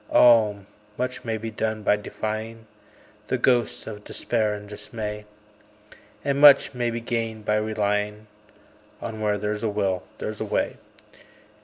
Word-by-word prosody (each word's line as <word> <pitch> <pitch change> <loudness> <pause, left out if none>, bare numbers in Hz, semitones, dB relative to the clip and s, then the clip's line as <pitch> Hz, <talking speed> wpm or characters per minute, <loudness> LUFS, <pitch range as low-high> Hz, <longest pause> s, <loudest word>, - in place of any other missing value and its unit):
Oh! 110 -4 +6 0.4
much 125 +1 -3
may 115 -1 -2
be 110 +1 -5
done 110 0 -2
by 105 - +4
defying 110 +2 -5 0.6
The - - 0
ghosts 120 -3 +1
of 105 -2 -8
Despair 110 -1 -1
and 105 0 -9
Dismay; 105 0 -6 1.0
And 140 0 +1
much 145 -2 +8
may 120 -1 0
be 115 0 -3
gained 115 -2 -3
by 105 0 +2
relying 105 0 -1 0.7
On 110 -1 -6
"Where 105 -1 +1
there's 105 +1 -2
a 115 - 0
will 100 -3 0 0.2
there's - - -5
a - - -1
way." - - -1
110 Hz, 145 wpm, -25 LUFS, 105-115 Hz, 1.0 s, much